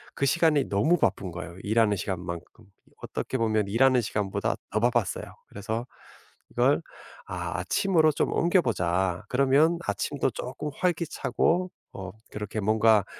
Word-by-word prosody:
그 140 - 0
시간이 155 -2 +3
너무 110 - +3
바쁜 100 - 0
거예요 90 0 -8
일하는 110 -1 +2
시간만큼. 90 +3 -5 0.2
이 - - -26
어떻게 130 - -3
보면 110 -3 +1
일하는 125 +4 +4
시간보다 105 -2 -1 0.2
더 110 - +1
바빴어요. 120 -4 +1 0.2
그래서 110 +4 -4 0.7
이걸 - - +3 0.4
'아 90 -1 -4
아침으로 160 - +3
좀 145 - 0
옮겨 175 +2 +3
보자.' 90 - 0
그러면 140 +6 +3
아침도 145 -2 -1
쪼끔 130 +4 -5
활기차고 175 +1 0 0.2
어 95 -2 -7 0.2
그렇게 105 +1 -4
뭔가 110 0 +4
110 Hz, 315 characters per minute, -27 LUFS, 95-140 Hz, 0.7 s, 일하는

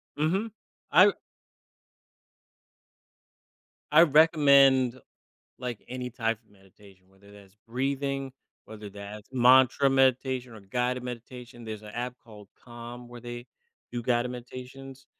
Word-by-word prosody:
Mhm. 190 +9 0 0.4
I - - +8
r - - -1 2.7
I 165 +3 +8
recommend, 140 -5 +5 0.6
like, 125 -3 -5
any 125 0 -5
type 115 -2 -2
of 105 - -32
meditation, 95 -1 -21
whether 100 +1 -20
that's 100 0 -17
breathing, 135 +2 -2 0.3
whether 105 -2 -10
that's 105 +1 -10
mantra 130 +2 +5
meditation, 130 -2 +1
or 110 - -11
guided 125 +5 -2
meditation, 120 -1 -9
there's 110 -1 -7
an 105 - -11
app 125 +3 -5
called 105 -4 -14
Calm 120 0 -10
where 120 -1 -11
they 120 +1 -8 0.5
do 120 -1 -3
guided 120 +1 0
meditations. 130 +2 -10
125 Hz, 120 wpm, -27 LUFS, 110-130 Hz, 2.7 s, I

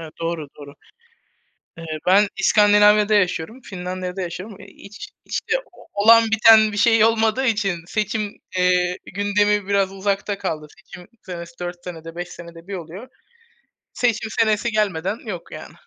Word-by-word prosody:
Evet, 160 -2 -9
doğru, 165 -3 -3
doğru. 145 0 -11 1.0
Eee, 165 - -9 0.2
ben 200 +3 +5
İskandinavya'da 210 0 +4
yaşıyorum, 200 +4 0
Finlandiya'da 185 -2 -6
yaşıyorum, 185 +4 -7
eee, 200 - -13 0.2
hiç 210 - -10 0.2
işte - - -3 0.4
olan 225 +3 +6
biten 220 0 +6
bir 205 - -6
şey 225 +1 +4
olmadığı 225 +3 +1
için 205 -6 0
seçim, 215 0 -2 0.2
eee, 180 0 +2 0.2
gündemi 205 0 +1
biraz 200 -1 +1
uzakta 200 +1 -2
kaldı. 155 -6 -4
Seçim 180 -2 -14
senesi 170 -2 -9
4 175 0 -6
senede, 165 -2 -9
5 175 0 -5
senede 170 0 -12
bir 200 - -7
oluyor. 180 +7 -9 0.9
Seçim 225 -2 0
senesi 225 +1 +2
gelmeden 200 -1 -1
yok 185 -6 -7
yani. - - -10
200 Hz, 140 wpm, -21 LUFS, 180-215 Hz, 1.0 s, olan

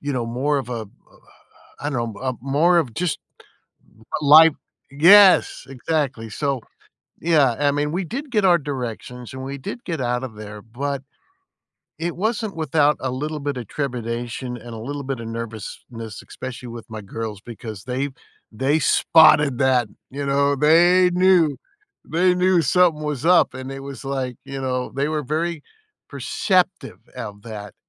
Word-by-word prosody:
you 145 0 -2
know, 120 -2 -1
more 135 +5 0
of, 130 - -6
a 125 - -3
a 115 - -4
a - - -10 0.9
I 145 - -2
don't 120 -5 -3
know - - -12
uh, 130 0 -1
a - - -5
more 150 +7 +3
of 130 -9 -1
just 175 -2 -1 1.0
l 145 - -1
life 160 +2 +9 0.4
Yes, 185 +7 +6
exactly. 135 -3 -2
So, 140 +1 -2 0.6
yeah, 150 -8 +3
I 145 -1 +3
mean, 145 +1 -1
we 180 +1 -1
did 275 - -6
get 210 -4 +1
our 175 -2 +5
directions 125 -3 -6
and 130 0 -6
we 140 +1 -5
did 235 - -7
get 165 -5 -3
out 125 0 -1
of 115 -4 -7
there, 105 -1 -9
but 135 +4 -4 1.0
it 170 +1 -3
wasn't 215 -1 -2
without 150 -1 +2
a 130 - -2
little 150 +4 -4
bit 140 -1 -3
of 120 -5 -6
trepidation 120 -2 -4
and 120 0 -10
a - - -7
little 140 +5 -5
bit 130 -3 -4
of 115 - -6
nervousness, 115 0 -7
especially 125 -1 -8
with 115 0 -10
my 110 -1 -6
girls 105 0 -6
because 110 -3 -9
they 130 +3 -2 0.4
they 135 +7 +1
spotted 150 -6 +5
that, 130 -4 +2 0.2
you 140 +2 -5
know, 140 +1 +2
they 175 +5 +5
knew. 180 -5 +3 0.5
They 180 +2 +2
knew 180 -1 +3
something 165 +1 +3
was 150 -1 -3
up 165 -8 +4
and 130 +1 -7
it 135 - -7
was 140 0 -9
like, 130 -3 -3
you 135 0 -6
know, 125 -1 -2
they 140 +2 0
were 155 -1 -1
very 160 +2 -2 0.5
perceptive 185 0 -1 0.2
of 105 -4 -7
that, 105 -3 -8
140 Hz, 170 wpm, -22 LUFS, 120-160 Hz, 1.0 s, life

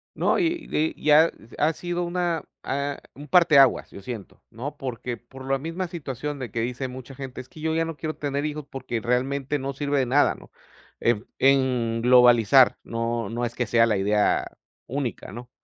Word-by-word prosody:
No, - - +2
y 335 -3 -1
y 155 +1 -1
ya 155 +2 +6 0.3
ha 155 +2 +2
sido 175 +2 -3
una, 175 -1 -1 0.2
ah, 140 +1 -2
un 145 +2 -11
parte 165 0 +5
aguas, 135 -2 +4
yo 100 - -10
siento, 110 -1 -8
¿no? 135 +6 -6
Porque, 125 -3 -5
por 130 +2 -13
la 135 - +2
misma 165 +5 -4
situación 145 -4 -5
de 125 -3 -6
que 115 - -2
dice 125 +3 -3
mucha 130 +1 -9
gente, 130 -1 -7
es 130 - -15
que 155 - -13
yo 160 0 0
ya 165 0 +1
no 165 -1 -5
quiero 155 +1 -4
tener 145 0 -2
hijos 150 -1 -4
porque 130 -4 -4
realmente 135 +4 -1
no 135 +1 -3
sirve 145 +1 -1
de 130 - +2
nada, 140 +4 +3
¿no? - - -16 0.5
Eb 115 -1 +1
en 130 -4 +2
globalizar, 125 0 +6
no, 115 -2 -2
no 120 +2 -2
es 120 0 -5
que 125 - -1
sea 115 0 +4
la 110 -3 +1
idea 105 +2 +2 0.4
única, 135 -1 -4
¿no? 120 +4 -9
135 Hz, 195 wpm, -25 LUFS, 120-150 Hz, 0.5 s, ya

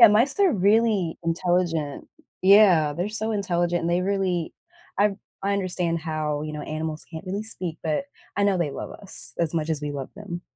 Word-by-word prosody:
And 230 -3 +10
mice 255 - +3
are 375 -6 +5
really 205 -3 +2
intelligent. 165 -3 0 0.3
Yeah, 185 -6 +6
they're 175 +7 -2
so 220 +1 -2
intelligent, 175 -4 0
and 170 - 0
they 175 - +2
really 185 -4 0 0.5
I 200 -1 +3 0.3
I 200 +1 +1
understand 180 -3 -1
how, 155 -2 -2
you 155 0 -4
know, 150 -1 -5
animals 155 0 -4
can't 160 +3 -7
really 200 +3 -2
speak, 180 -7 -5
but 160 - 0 0.3
I 200 - +2
know 200 -2 +3
they 155 -4 0
love - - -6
us 200 - -9
as 170 -1 0
much 160 0 0
as 155 -2 -1
we 145 -1 -3
love 135 -2 -5
them. 180 -4 -6
175 Hz, 195 wpm, -25 LUFS, 160-200 Hz, 0.5 s, And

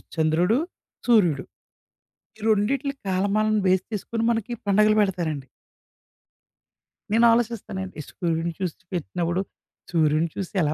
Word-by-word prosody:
చంద్రుడు, 165 +7 +2 0.5
సూర్యుడు. 175 - +4 0.9
ఈ - - -17
రెండిట్లి 265 +7 +1
కాలమాలను 205 +3 +2
బేస్ 185 0 +3
చేసుకొని, 225 +2 -2
మనకి 230 +1 -3 0.2
పండగలు 215 +2 +4
బెడతారండి. 165 -9 -1 1.6
నేను 230 +2 +5
ఆలోచిస్తానండి. 215 -5 -1
ఈ - - -9
సూర్యుడిని 165 -1 -2
చూసి 180 -4 -2 0.2
పెట్టినప్పుడు, 175 +1 -1 0.5
సూర్యుడిని 160 -1 +2
చూసి 195 -3 -5
ఎలా 150 0 +1
190 Hz, 105 wpm, -24 LUFS, 170-215 Hz, 1.6 s, నేను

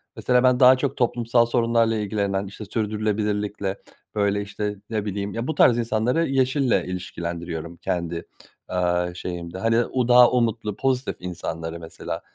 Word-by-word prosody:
Mesela 125 0 +2
ben 125 -1 +4
daha 130 0 +8
çok 135 +1 -2
toplumsal 120 -1 +2
sorunlarla 115 -1 +2
ilgilenen, 100 -2 -1
işte 105 +2 -9
sürdürülebilirlikle 105 -2 -2 0.4
böyle 100 -1 +1
işte 105 0 -4
ne 110 -2 -2
bileyim 100 0 -3
ya 115 +2 -3
bu 160 - -2
tarz 120 - +5
insanları 120 +7 +1
yeşille 130 -1 +2
ilişkilendiriyorum 85 -2 -5
kendi, 85 -1 -3 0.4
aaa, 90 -1 0
şeyimde. 85 0 -6
Hani 115 +4 +2
o 125 -2 -1
daha 125 0 +7
umutlu, 115 -4 0
pozitif 130 +1 -1
insanları 85 -2 -5
mesela 80 0 -6
105 Hz, 140 wpm, -24 LUFS, 90-120 Hz, 0.4 s, daha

